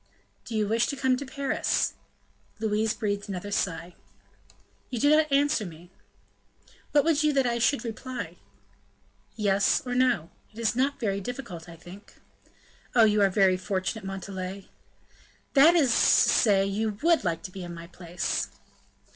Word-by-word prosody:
"Do 230 - -6
you 215 -1 +1
wish 230 +3 +1
to - - -3
come 260 -1 +1
to 280 +1 -7
Paris?" 275 +1 -1 0.6
Louise 220 0 0
breathed 205 -2 -3
another 195 +1 -5
sigh. 180 -2 -2 1.0
"You 245 - -3
do 290 +5 +4
not 305 -1 +2
answer 285 -3 +2
me." 175 -1 -11 1.0
"What 290 -1 +4
would 315 -2 +2
you 305 0 +3
that 270 -2 +2
I 235 -1 0
should 240 +3 +1
reply?" 250 +3 -6 1.0
"Yes 205 -2 +2
or 250 - -3
no; 250 -10 +1 0.2
that - - -10
is 230 0 +1
not 275 +3 0
very 200 -5 -1
difficult, 195 -8 -7
I 170 - -10
think." 175 +5 -14 0.8
"Oh! 235 - +7
you 210 -1 +4
are 200 - +5
very 190 -1 +3
fortunate, 190 +3 -3
Montalais!" 195 0 -6 0.8
"That 310 +5 +7
is 285 -8 +4
to - - +3 0.3
say 200 -4 +4
you 210 +1 -2
would 335 -5 +3
like 165 -3 -2
to 185 - -7
be 190 0 -8
in 175 -1 -7
my 170 0 -9
place." 175 0 -3
215 Hz, 160 wpm, -27 LUFS, 190-255 Hz, 1.0 s, Oh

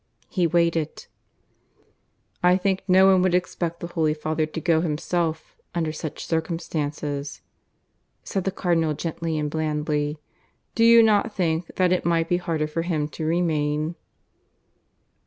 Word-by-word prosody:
He 180 -3 +2
waited. 165 -2 0 1.4
"I 180 +1 +5
think 190 0 0
no 190 0 +6
one 190 -1 +5
would 180 -1 +2
expect 170 -2 -2
the - - -3
Holy 160 -3 0
Father 155 0 -1
to 155 - -5
go 160 -1 +2
himself 165 0 -2 0.2
under 160 -2 0
such 155 0 -6
circumstances," 150 -3 -3 0.8
said 195 - -2
the - - +2
Cardinal 165 -5 0
gently 165 0 -3
and 150 -1 -1
blandly. 150 -1 -1 0.6
"Do 230 - +2
you 230 0 +8
not 215 0 +2
think 165 -2 -1
that 185 -1 +2
it 180 - 0
might 165 -1 +1
be 175 - +3
harder 165 -3 -1
for 155 +2 -3
him 155 -3 -1
to 155 - -5
remain?" 155 -2 0
165 Hz, 140 wpm, -24 LUFS, 155-180 Hz, 1.4 s, you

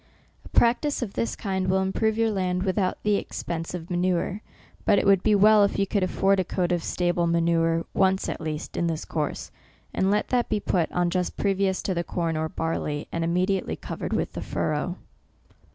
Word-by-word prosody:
A - - -13
practice 245 +4 +2
of 200 -4 -6
this 230 - -2
kind 190 -2 -2
will 190 +1 +2
improve 220 +3 0
your 225 -1 +2
land 185 -2 -1
without 190 -1 0
the 210 -1 +3
expense 165 -2 -4
of 170 0 -7
manure; 180 +3 0 0.4
but - - +4
it - - +2
would 195 -2 +5
be 215 0 +3
well 210 +1 +6
if 200 - +1
you 200 - +2
could 200 +1 0
afford 195 +1 +2
a - - +2
coat 180 0 -1
of 175 -2 0
stable 175 -1 0
manure, 165 0 +2
once, 190 0 +2
at - - -4
least, 155 -1 -5
in 170 - 0
this 160 -2 -3
course; 150 -2 -3 0.4
and 190 - +1
let 210 +1 +1
that 245 -1 +1
be 210 - +1
put 175 -4 0
on 175 -1 +1
just 180 0 -1
previous 195 -1 0
to 190 - -1
the 170 -1 -1
corn 170 -2 -2
or 160 0 -1
barley, 150 -2 -3
and 165 - -2
immediately 185 +3 0
covered - - -6
with - - -1
the - - -5
furrow. - - -2
185 Hz, 200 wpm, -25 LUFS, 170-200 Hz, 0.4 s, well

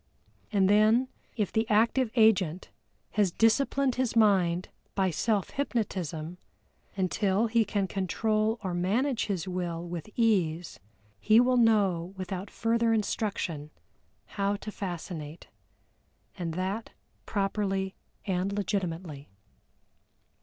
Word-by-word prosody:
And 195 -3 +3
then 215 +5 +4 0.3
if 210 -4 0
the 220 0 0
active 230 +3 +3
agent 195 -7 +3 0.4
has 205 -4 +2
disciplined 260 +5 +2
his 250 -3 -1
mind 185 -5 +3 0.3
by 190 -2 +2
self 205 +4 0
hypnotism 180 - -3 0.6
until 195 +3 +1
he 230 0 +3
can 205 -2 -1
control 215 +4 0
or 185 -2 -2
manage 225 +9 0
his 190 -3 -2
Will 175 -2 -3
with 170 +2 -6
ease, 180 -8 +1 0.4
he 215 - +5
will 250 +1 +4
know 200 -6 +2
without 185 +1 -5
further 230 0 +1
instruction 195 -8 -2 0.6
how 200 0 -1
to 215 +1 -7
fascinate, 170 -5 -6 0.9
and 170 -4 -4
that 190 +5 -3 0.4
properly 195 -2 -1 0.3
and 190 0 -1
legitimately. 175 -7 -3
195 Hz, 110 wpm, -29 LUFS, 180-220 Hz, 0.9 s, he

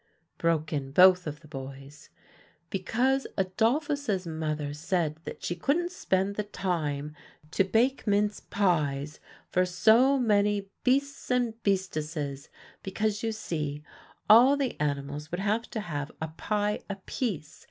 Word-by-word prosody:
broke 160 -2 +1
in 135 -2 -3
both 180 +2 +6
of 150 +1 -6
the 155 - -15
boys. 135 0 -9 0.6
"Because 250 +8 +1
Adolphus's 225 - 0
mother 155 -3 -3
said 155 0 -1
that - - -8
she 175 - -2
couldn't 330 - 0
spend 195 - 0
the 210 - 0
time 155 -7 -3 0.4
to 195 - +3
bake 235 +7 +1
mince 205 0 +2
pies 150 -7 0 0.3
for 185 - +3
so 225 +9 +4
many 205 -4 +1
beasts 280 +2 0
and 245 -2 +1
beastesses, 155 -8 -2 0.3
because 210 +2 -1
you 225 - -1
see, 150 -9 -4 0.4
all 250 +6 +7
the 270 -4 -1
animals 145 +1 -2
would 175 - -3
have 215 +3 0
to 220 - -4
have 150 -5 -4
a 160 - -3
pie 210 +5 -1
apiece. 195 - -4
185 Hz, 130 wpm, -28 LUFS, 150-220 Hz, 0.6 s, all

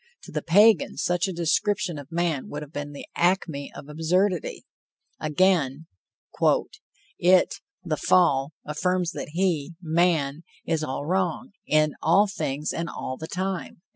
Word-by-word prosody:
To - - -11
the - - -2
Pagan, 205 +3 +4
such 175 +1 +1
a - - -2
description 175 +1 0
of 145 +2 -12
man 165 -5 -1
would 150 +1 -5
have 150 +1 -13
been 145 0 -5
the 145 - -9
acme 170 -5 0
of - - -9
absurdity. 175 +4 0 0.5
Again: 155 -3 +1 1.3
"It 180 +1 +4 0.3
(the 160 -4 -2
fall) 140 -6 +3
affirms 180 +3 0
that - - -6
he 170 -3 0
(man) 160 -3 +1 0.2
is 160 -1 0
all 140 -1 -3
wrong, 180 +1 -1 0.2
in 155 -1 +3
all 185 +6 +5
things 150 -7 -3
and 170 -1 -3
all 130 - -5
the 160 - -7
time." 185 -1 -4
165 Hz, 140 wpm, -25 LUFS, 150-185 Hz, 1.3 s, all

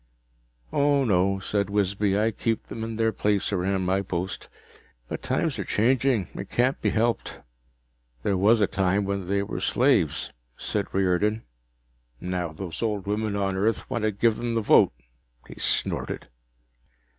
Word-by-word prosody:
"Oh, 140 -1 +3
no," 95 -2 +2
said 100 +1 -1
Wisby. 100 0 +1
"I 110 +2 +2
keep 115 +1 -1
them 110 - -7
in 115 0 -4
their 110 0 +2
place 105 -1 0
around 95 0 0
my 95 +2 +1
post. 90 -1 -4 0.6
But - - -5
times - - -1
are - - -1
changing. 120 -2 +2
It - - -7
can't 125 +3 +1
be - - +2
helped." 115 +1 0 0.8
"There 100 - +1
was 105 +4 +4
a - - +6
time 95 +1 +1
when 100 -2 -3
they 100 +1 +1
were - - -4
slaves," - - +2 0.2
said - - -2
Riordan. 95 +4 +1 0.8
"Now 90 -2 -3
those 80 -1 -7
old 105 -4 -1
women 105 +1 -1
on 100 -1 0
Earth 105 +4 0
want 120 -3 -1
to 110 0 +1
give 110 +2 +1
'em 120 -1 -2
the 115 - +2
vote." 105 - +5 0.6
He - - -11
snorted. - - -1
100 Hz, 155 wpm, -26 LUFS, 95-110 Hz, 0.8 s, a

